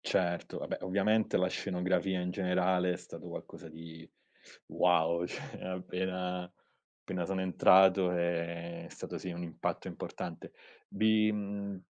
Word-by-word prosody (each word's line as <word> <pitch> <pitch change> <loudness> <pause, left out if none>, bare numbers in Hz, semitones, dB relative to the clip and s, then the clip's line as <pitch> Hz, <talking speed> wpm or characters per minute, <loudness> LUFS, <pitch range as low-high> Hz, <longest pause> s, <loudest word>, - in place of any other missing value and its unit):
Certo, 85 -2 0
vabbè - - -4
ovviamente 100 +4 +2
la 90 - +3
scenografia 95 0 0
in 90 0 -2
generale 90 -1 +2
è 90 - -2
stato - - -10
qualcosa 80 - -8
di 80 +1 -11 0.6
wow, 85 -1 +3
cioè - - -8
appena 90 -1 -3 0.5
appena 90 -2 -3
sono 95 +1 -1
entrato 95 0 +6
è 85 -1 -2
stato - - -6
sì 95 - -5
un 85 0 -5
impatto 80 -2 -3
importante. - - -6 0.4
Vi 110 0 +3
mhmm, 100 -2 -4
90 Hz, 125 wpm, -32 LUFS, 85-95 Hz, 0.6 s, entrato